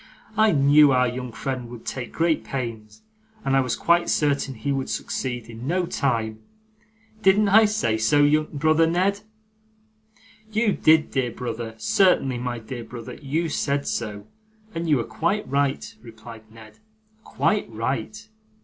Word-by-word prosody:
'I 220 -1 +4
knew 145 0 +6
our 125 -1 +3
young 125 0 -5
friend 125 +1 -5
would 120 -1 -11
take 125 -2 -5
great 165 -1 0
pains, 110 -5 -6 0.4
and 135 - +2
I - - +5
was 125 -2 0
quite 175 0 +2
certain 140 -3 0
he 115 +6 -3
would 135 -1 -2
succeed, 125 -3 -4
in 115 +2 -8
no 180 +3 +1
time. 115 -9 -1 0.8
Didn't 200 +1 +4
I 220 +2 +7
say 205 - 0
so, 145 +6 +3
brother 155 +2 +2
Ned?' 185 +4 +1 1.3
'You 220 0 +2
did, 155 0 +4
my - - -21
dear 130 -3 -1
brother; 115 -1 -5
certainly, 130 - +2
my 125 0 -3
dear 120 +1 -7
brother, 115 -1 -9
you 155 +5 -2
said 140 -2 -1
so, 105 -3 -4 0.5
and 165 0 -3
you 150 - +4
were 120 - -1
quite 195 - -2
right,' 140 0 -1
replied 110 -1 -13
Ned. 110 -1 -15 0.4
'Quite 210 - 0
right. 125 - -4
135 Hz, 150 wpm, -24 LUFS, 115-160 Hz, 1.3 s, I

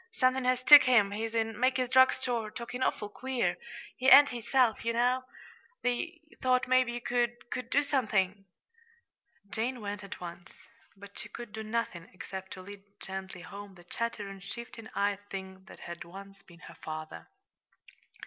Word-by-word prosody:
"Somethin' 255 -5 +2
has 255 0 +2
took 295 +1 +10
him. 225 -6 +4
He's 220 +2 -3
in 225 -1 -1
Mackey's 255 0 +2
drug 260 +1 +6
store, 240 -4 -2
talkin' 240 +3 -6
awful 210 - 0
queer. 255 +4 -1 0.4
He 260 0 +3
ain't 285 +1 +10
his 235 -2 -7
self, 250 -4 +3
ye 230 - +1
know. 250 +2 +2 0.6
They 320 +8 -2 0.2
thought 255 0 +2
maybe 255 -1 +3
you 240 - -4
could 240 0 0 0.3
do 285 +2 +3
somethin'." 210 -8 0 1.1
Jane 240 +3 -2
went 205 -1 -5
at 200 - -8
once 175 -1 -9 0.4
but 200 0 -12
she - - -8
could 240 -3 -9
do 220 +1 -6
nothing 215 -6 -3
except 190 +1 -7
to 185 - -10
lead 200 +1 -10 0.2
gently 190 -1 -7
home 200 +1 -10
the 175 - -15
chattering, 205 0 -4
shifting 225 +3 -8
eyed 200 0 +1
thing 190 -1 -8
that - - -13
had 170 0 -7
once 195 +2 -12
been 175 0 -18
her - - -12
father. 155 0 -7
225 Hz, 165 wpm, -30 LUFS, 195-250 Hz, 1.1 s, took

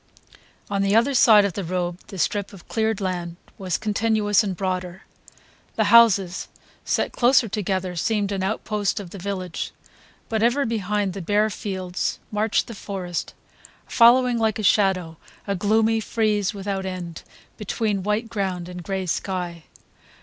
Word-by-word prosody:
On 200 -1 -1
the 195 +1 +2
other 235 +5 +3
side 215 -5 +6
of 200 - -2
the 200 - -4
road 175 0 -2
the 195 - -9
strip 200 +4 -1
of 190 - -14
cleared 220 -2 0
land 175 -3 -3 0.2
was 185 -3 -1
continuous 215 -1 +1
and 190 -4 -3
broader; 185 -1 -3 0.7
the - - +2
houses, 200 -6 +5 0.4
set - - 0
closer 245 -1 +4
together, 190 -3 -2
seemed 205 +3 0
an 195 -1 -2
outpost 210 +1 -1
of 185 -4 -9
the 200 - -8
village; 185 -2 -4 0.5
but 220 -1 -1
ever 245 +5 +2
behind 210 -3 -1
the 195 - -6
bare 210 +4 +1
fields 185 -2 -3
marched 210 0 +1
the 230 - -8
forest, 190 -4 -5 0.5
following 240 0 +5
like 220 -1 +1
a 215 - -4
shadow, 185 -4 +2 0.3
a 200 - -1
gloomy 220 +4 +2
frieze 215 -2 0
without 195 -1 -4
end 175 -3 -6 0.4
between 210 -1 -1
white 210 +4 -1
ground 190 -5 -3
and 180 0 -7
gray 190 +2 -3
sky. 175 -2 -3
200 Hz, 150 wpm, -23 LUFS, 185-220 Hz, 0.7 s, side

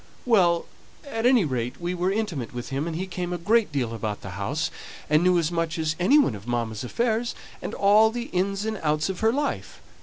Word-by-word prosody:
"Well! 180 -8 +3 0.4
at 230 -4 0
any 250 -7 +5
rate 125 -4 -3
we 175 +1 -2
were 180 +1 0
intimate 175 - -3
with 120 - -5
him, 140 +4 -2
and 165 - -3
he 185 +3 -2
came 180 -1 -4
a 175 - -1
great 210 +3 +2
deal 125 -5 -1
about 110 -2 -4
the 100 - -7
house, 145 - -2 0.4
and 150 +1 +5
knew 180 0 +4
as 165 -1 +1
much 165 -1 -1
as 155 -1 0
any 230 +12 +5
one 285 - +4
of 105 +2 -10
mamma's 115 -2 -2
affairs, 235 - -1 0.3
and - - -5
all 210 +2 +5
the 240 +1 -5
ins 195 +3 0
and 220 -2 -2
outs 155 +2 +1
of 190 - -4
her 220 0 +3
life. 285 +3 -3
175 Hz, 220 wpm, -25 LUFS, 140-215 Hz, 0.4 s, any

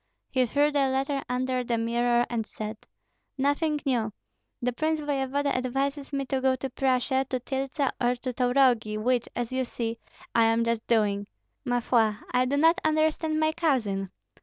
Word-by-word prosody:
He 255 -2 +2
threw 290 +5 +2
the 280 -2 +2
letter 275 +1 0
under 255 0 0
the 235 -1 -1
mirror 240 +1 +2
and 235 -2 -2
said, 215 0 -7 0.5
"Nothing 290 +3 +1
new! 235 -5 +1 0.5
The 245 0 -1
prince 315 +5 0
voevoda 280 -1 -1
advises 275 +3 -2
me 275 -1 -1
to 265 0 -1
go 260 0 +3
to 260 0 -5
Prussia, 260 0 +1
to 255 - -1
Tyltsa 270 +2 -2
or 245 +1 +3
to 250 +1 -5
Taurogi, 245 -4 +2
which, 240 +2 0
as 245 -1 -2
you 260 0 0
see, 230 -2 -4 0.3
I 230 -1 +5
am 225 +1 +3
just 230 -1 -1
doing. 205 -3 +1 0.4
Ma 245 -1 +1
foi, 225 -3 +2 0.2
I 250 0 +3
do 280 +3 0
not 330 +5 +4
understand 310 0 +1
my 315 0 +3
cousin. 235 - 0
255 Hz, 170 wpm, -27 LUFS, 235-280 Hz, 0.5 s, I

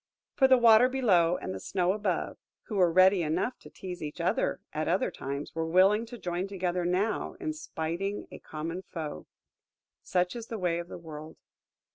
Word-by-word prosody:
For 265 - +4
the 260 -1 +6
Water 235 +1 +7
below 185 -10 +3
and 95 - -5
the 95 - -5
Snow 180 - 0
above, 205 -4 -2 0.2
who 215 - -6
were 180 -3 +4
ready 185 +2 +5
enough 170 +10 -1
to - - -14
tease 180 -2 -8
each 150 -1 -6
other - - 0
at - - -2
other - - +1
times, 140 +2 -5
were 165 0 -2
willing 195 +6 +4
to 240 +1 -9
join 180 -1 -3
together 180 -2 -2
now 190 +5 0
in 320 -4 -2
spiting 195 - -4
a - - -9
common 165 +4 -5
foe. 160 -5 -7 0.7
Such 180 +2 0
is 230 -1 -6
the 225 - -5
way 175 -3 0
of 170 - -6
the - - -8
world! 155 -2 -10
180 Hz, 185 wpm, -29 LUFS, 165-210 Hz, 0.7 s, Water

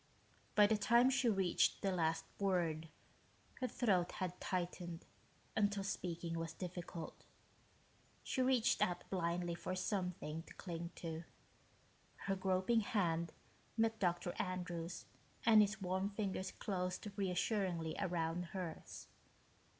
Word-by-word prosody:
By 210 - +8
the 215 +1 +3
time 240 +4 +6
she 265 -2 +3
reached 190 -4 +3
the 195 - +2
last 165 -2 +1
word, 170 -5 +1 0.7
her 255 - 0
throat 185 -9 +2
had 180 -1 -3
tightened 175 -2 -3 0.5
until 205 -2 +2
speaking 170 -3 -2
was 165 0 -3
difficult. 175 -2 -6 1.0
She 260 - 0
reached 255 -2 +3
out 175 -1 +2
blindly 175 -1 0
for 185 +2 -3
something 180 -5 -2
to - - -12
cling 170 -2 -4
to. 165 -1 -4 1.0
Her 195 - +1
groping 190 +4 +2
hand 170 -6 +1 0.5
met 225 0 +2
Dr. 175 -1 +1
Andrews' 180 -2 -3 0.4
and 220 -2 +9
his 210 0 +2
warm 190 +1 0
fingers 195 -2 -2
closed 180 0 -2
reassuringly 185 -3 0
around 175 -2 0
hers. 180 -4 -5
185 Hz, 120 wpm, -38 LUFS, 170-200 Hz, 1.0 s, and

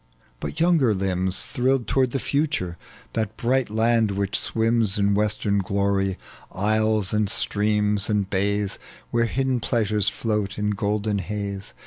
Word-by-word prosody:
But 155 - -5
younger 160 -10 +3
limbs 95 0 -1
Thrilled 130 -2 0
toward 130 -2 +2
the 135 - -2
future, 140 - -1 0.4
that 110 -2 -2
bright 130 0 +1
land 110 0 +2
which 100 +1 -2
swims 115 -2 +1
In 100 0 +2
western 105 0 +1
glory, 100 0 0 0.3
isles 110 0 +1
and 105 -1 +1
streams 105 0 +1
and 105 -2 +1
bays, 100 +1 -1 0.3
Where 120 0 +2
hidden 130 +2 0
pleasures 110 -4 +1
float 105 -2 -2
in 105 0 0
golden 105 +1 -1
haze. 100 0 -5
105 Hz, 135 wpm, -24 LUFS, 100-115 Hz, 0.4 s, younger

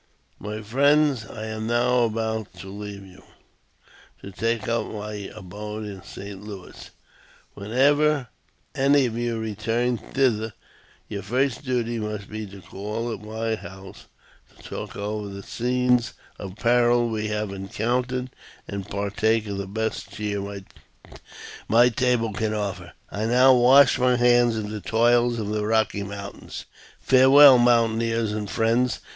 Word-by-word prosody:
*' - - -40
My 110 +1 -5
friends! 140 +1 +2
I 110 -1 -7
am 110 0 -4
now 120 +1 +2
about 110 -3 -3
to 95 +1 -10
leave 100 0 -8
you, 95 -1 -16 1.0
to 100 - -8
take 115 +5 -2
up 115 0 0
my 105 -2 -6
abode 105 +4 -7
in 100 -2 -8
St. 100 +1 -9
Louis. 100 -3 -10 0.6
Whenever 140 +5 +2 0.4
any 140 0 +3
of 115 -2 -3
you 120 -1 -2
return 115 +2 -1
thither, 115 -5 0 0.5
your 100 -1 -5
first 125 +6 -1
duty 120 -3 -1
must 105 -2 -5
be 110 0 -5
to 100 0 -12
call 105 +6 -5
at 100 - -8
my 110 +1 -3
house, 95 -2 -10 0.5
to - - -18
talk - - -7
over 105 0 -4
the 100 0 -8
scenes 125 +1 0 0.3
of 95 -2 -7
peril 120 +1 +3
we 110 -1 -2
have 105 -1 -2
encountered, 120 +6 -2 0.4
and 100 -2 -6
partake 105 +3 0
of 100 -1 -4
the 100 - -4
best 110 +3 -3
cheer 100 -2 -4 1.0
my 120 +2 +5
table 120 -2 0
can 110 +1 -1
afford 95 -4 -4
you. - - -12
" - - -34
I 110 - 0
now 125 +3 +6
wash 130 +2 +6
my 125 0 +3
hands 120 -1 +4
of 105 -1 -4
the 105 -1 -5
toils 120 +2 +2
of 105 -2 -3
the 105 0 -1
Eocky 110 -1 +1
Moun 100 0 -6
tains. - - -8 0.4
Farewell, 135 0 +7
mountaineers 115 -2 +2
and 105 -1 -4
friends 120 +3 +1
110 Hz, 150 wpm, -24 LUFS, 105-120 Hz, 1.0 s, Farewell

